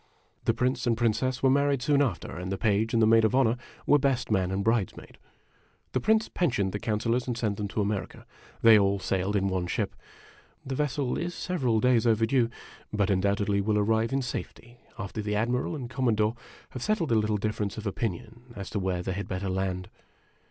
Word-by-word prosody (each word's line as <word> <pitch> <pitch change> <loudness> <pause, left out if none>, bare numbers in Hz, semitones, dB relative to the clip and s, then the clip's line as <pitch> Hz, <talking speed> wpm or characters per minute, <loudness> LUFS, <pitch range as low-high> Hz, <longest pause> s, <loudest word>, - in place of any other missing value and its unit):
The - - +3
Prince 125 0 0
and 115 -1 +2
Princess 125 +3 0
were 135 - +5
married 140 -1 +2
soon 145 +1 +3
after, 120 -11 -2
and 90 +2 -5
the 95 - -1
Page 110 +1 +1
and 115 -1 +3
the - - +6
Maid 115 +1 +5
of 110 +3 +2
Honor 120 -3 +3 0.3
were 145 - +5
best 130 -4 0
man 95 -3 +2
and 95 +1 -1
bridesmaid. 115 -4 -1 0.7
The - - 0
Prince 220 +1 +2
pensioned 120 - 0
the 105 - -3
Councilors 115 +4 -1
and 120 -2 -2
sent 105 -4 -1
them 105 - -2
to 105 - -2
America. 100 -1 -3 0.4
They 115 -2 +8
all 100 0 +2
sailed 95 +1 -1
in 100 -1 +1
one 95 -2 -1
ship. - - -2 0.7
The 135 - -4
vessel 140 -2 -1
is 175 0 -3
several 130 -11 0
days 120 -1 +3
overdue, 115 +2 +3 0.4
but 105 -1 +1
undoubtedly 100 +1 +1
will 105 +1 +1
arrive 110 +3 +1
in 135 0 0
safety 120 -1 -7 0.2
after 105 0 -4
the 105 0 -2
Admiral 120 +8 0
and 130 -5 -5
the 120 - -14
Commo 130 -5 +1
dore 110 +2 +1 0.4
have 125 - -7
settled 180 - 0
a - - +4
little 105 0 0
difference 105 0 -2
of 110 - -6
opinion 115 +4 -4
as 100 -3 -7
to 105 - -1
where 90 -2 -1
they 95 - -2
had 100 +2 -4
better 95 +1 -3
land. 95 -1 -2
110 Hz, 205 wpm, -28 LUFS, 100-125 Hz, 0.7 s, They